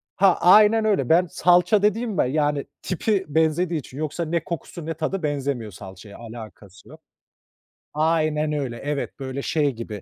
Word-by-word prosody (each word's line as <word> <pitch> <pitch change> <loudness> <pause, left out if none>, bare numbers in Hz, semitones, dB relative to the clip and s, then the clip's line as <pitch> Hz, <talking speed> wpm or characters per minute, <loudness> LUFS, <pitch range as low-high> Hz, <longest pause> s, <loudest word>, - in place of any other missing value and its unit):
Ha, 190 -2 +4
aynen 215 +4 +6
öyle. 195 - +1
Ben 175 +3 +5
salça 180 +5 +3
dediğim 215 0 0
be - - +2
yani 145 0 0 0.2
tipi 190 +2 -1
benzediği 160 +2 +1
için 130 0 -12
yoksa 155 +3 -3
ne 165 0 -1
kokusu 170 0 -7
ne 165 - -3
tadı 160 +3 -3
benzemiyor 140 -7 -2
salçaya, 95 +2 -12
alakası 110 -4 -12
yok. - - -14 0.9
Aynen 155 -1 +1
öyle, 130 -5 -3
evet 145 +1 -4
böyle 135 0 -5
şey 145 -2 0
gibi 110 -4 -7
155 Hz, 155 wpm, -23 LUFS, 135-175 Hz, 0.9 s, aynen